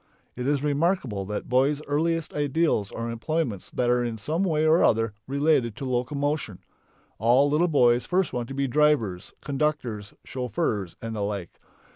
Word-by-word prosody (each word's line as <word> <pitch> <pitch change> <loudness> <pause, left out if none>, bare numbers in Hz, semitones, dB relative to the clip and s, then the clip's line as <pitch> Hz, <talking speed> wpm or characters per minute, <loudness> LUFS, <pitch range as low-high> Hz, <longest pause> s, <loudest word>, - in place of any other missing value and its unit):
It 125 +1 -3
is 145 -1 +1
remarkable 145 - 0
that 105 +1 -4
boys' 135 +4 +2
earliest 160 +2 0
ideals 145 - 0
are 115 0 -4
employments 115 - -2
that 125 - -1
are 125 0 +2
in 115 -2 -3
some 155 - -2
way 155 -5 +1
or 160 +2 +5
other 115 -1 +2
related 140 -5 +1
to 135 - -6
locomotion. 130 - -1 0.6
All 120 +6 +4
little 160 +4 +3
boys 125 -6 +3
first 185 0 +1
want 120 -1 -2
to 135 - -7
be 140 0 0
drivers, 125 -10 +1
conductors, 135 -8 -2
chauffeurs, 110 -7 -2
and 115 -1 -4
the 105 - -3
like. 100 -4 -4
130 Hz, 160 wpm, -26 LUFS, 115-150 Hz, 0.6 s, or